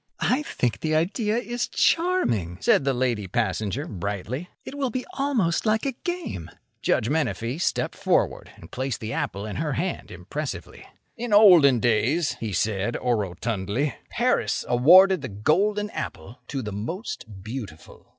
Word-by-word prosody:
"I 260 +4 +2
think 125 - -2
the 155 -1 0
idea 210 +7 +1
is 240 0 -2
charming," 120 - +1
said 135 - +3
the 135 - +2
lady 120 -5 0
passenger, 110 - -1
brightly. 105 - -4 0.2
"It - - -7
will 280 -2 -1
be 255 +2 -4
almost 260 - +1
like 220 +3 +2
a 275 - +1
game." 265 - -5 0.3
Judge 110 - +1
Menefee 140 -2 -1
stepped 175 - 0
forward - - 0
and - - -14
placed 130 -1 -3
the 110 0 -5
apple 100 +1 -3
in 105 - -5
her 150 0 -1
hand 175 +8 -3
impressively. - - -6 0.3
"In 235 -2 -3
olden 175 - +7
days," 125 +7 +2
he 110 -2 -3
said, 105 +3 0
orotundly, 110 +3 -1 0.2
"Paris - - 0
awarded 180 +8 +6
the 130 - -5
golden 200 - +1
apple 80 +10 -6
to 135 -2 -4
the 105 - -5
most 110 - -6
beautiful." 110 -8 -8
135 Hz, 150 wpm, -25 LUFS, -, 0.3 s, olden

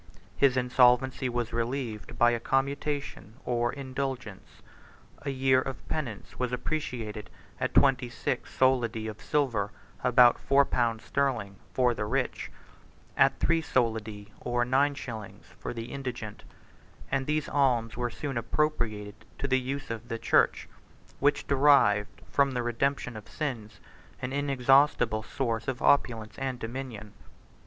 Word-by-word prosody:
His 135 -2 +3
insolvency 125 +1 +3
was 120 -1 -2
relieved 115 -2 -3
by 120 0 +5
a 120 - 0
commutation, 140 -3 -2
or 120 -1 +1
indulgence: 130 -6 -6 0.6
a 140 - -4
year 130 -1 +3
of 135 0 -7
penance 125 -10 -5
was 125 -1 -1
appreciated 115 -7 -4 0.3
at - - -2
twenty 130 -3 +4
six - - -3
solidi 120 -4 +2
24 110 - -3
of 105 - -14
silver, 120 -9 0 0.3
about 125 -1 +6
four 140 +1 +4
pounds 115 -4 0
sterling, 120 -8 -1
for 125 -2 +2
the 105 - -3
rich; 125 +4 -2 0.7
at - - +4
three 165 0 +2
solidi, 110 -6 -1
or 120 0 0
nine 140 +3 +2
shillings, 110 -7 -8
for - - -4
the 115 -1 -6
indigent: 120 -6 -6 0.7
and 135 -1 0
these 150 -1 0
alms 120 -5 +1
were 120 0 -1
soon 135 +1 -3
appropriated 115 -5 -1 0.2
to 140 - -2
the 130 -1 +3
use 135 0 -4
of 115 +1 -6
the 115 - -3
church, - - +2 0.5
which 145 +1 +2
derived, 135 -8 +3
from 140 -1 +2
the 125 -1 -1
redemption 125 +1 -1
of 105 -1 -10
sins, 120 -9 -4 0.4
an 125 +1 -4
inexhaustible 135 -4 +3
source 115 +1 -3
of 130 -2 -2
opulence 115 -6 +2
and 130 -2 -2
dominion. 115 -3 -6
125 Hz, 140 wpm, -28 LUFS, 115-135 Hz, 0.7 s, about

